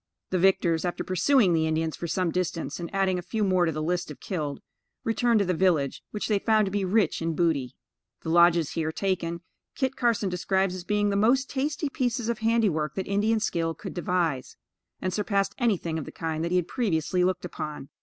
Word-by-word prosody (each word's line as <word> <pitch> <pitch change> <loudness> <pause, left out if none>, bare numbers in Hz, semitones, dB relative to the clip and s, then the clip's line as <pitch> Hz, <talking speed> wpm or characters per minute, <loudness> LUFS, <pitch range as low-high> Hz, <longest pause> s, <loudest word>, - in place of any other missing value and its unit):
The 185 - +1
victors, 170 -3 +3
after 175 - -2
pursuing 185 - +3
the 160 -1 +2
Indians 160 0 -1
for 170 - -5
some 170 +1 0
distance, 180 -2 -2
and 170 - -5
adding 190 -2 +1
a - - -4
few 215 +4 -2
more 185 -3 +3
to - - +1
the 155 0 -3
list 175 +1 -1
of 150 - -9
killed, 150 -7 -4 0.4
returned 230 +1 +2
to - - +1
the 185 - +1
village, 160 -6 +1
which 210 - -3
they 210 -2 +2
found 215 0 +3
to 190 - -3
be 200 0 0
rich 190 -3 +1
in 165 0 -1
booty. 150 -8 0 0.5
The - - -4
lodges 170 -2 +5
here 160 -1 -1
taken, 170 -2 -2 0.3
Kit 265 -1 -1
Carson 235 -4 +1
describes 190 +1 0
as 185 -1 -6
being 205 +1 +1
the - - 0
most 245 +6 +2
tasty 290 +3 -1
pieces 245 -3 -1
of 235 - -1
handiwork 210 -10 +1
that 190 - -2
Indian 210 +3 +2
skill 165 -5 -1
could 195 - -7
devise, 170 -6 -1 0.4
and 185 - -2
surpassed 200 -1 0
anything 180 -9 0
of 150 - -6
the - - -8
kind 160 -1 -3
that 170 - -1
he 180 - +2
had 180 -1 0
previously 180 - 0
looked 180 0 0
upon. 150 -5 -6
180 Hz, 210 wpm, -27 LUFS, 165-210 Hz, 0.5 s, lodges